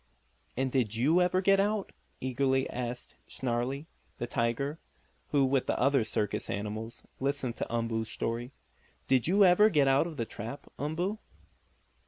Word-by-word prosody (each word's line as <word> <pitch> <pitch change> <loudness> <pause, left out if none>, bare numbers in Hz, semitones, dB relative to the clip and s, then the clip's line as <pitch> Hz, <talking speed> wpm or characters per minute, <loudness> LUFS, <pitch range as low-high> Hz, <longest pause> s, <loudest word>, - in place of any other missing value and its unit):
"And 130 0 0
did 120 -5 +1
you 150 +10 +3
ever 180 +1 +2
get 195 +1 +4
out?" 205 0 0 0.3
eagerly 130 +1 +1
asked 125 0 -5
Snarlie, 130 +3 -2 0.3
the - - -2
tiger, 120 +7 -1 0.5
who, 140 -2 +3
with 135 0 +1
the - - 0
other 135 -1 +3
circus 105 -1 -1
animals, 110 +3 -4 0.2
listened 135 -3 -1
to - - -4
Umboo's 115 -1 -1
story. 120 +2 -3 0.6
"Did 130 0 +3
you 195 +3 +5
ever 190 +4 +6
get 145 -7 +3
out 135 +4 +4
of 160 -3 -8
the 115 - -1
trap, 115 +6 -7
Umboo?" 175 +8 -2
135 Hz, 150 wpm, -30 LUFS, 120-155 Hz, 0.6 s, ever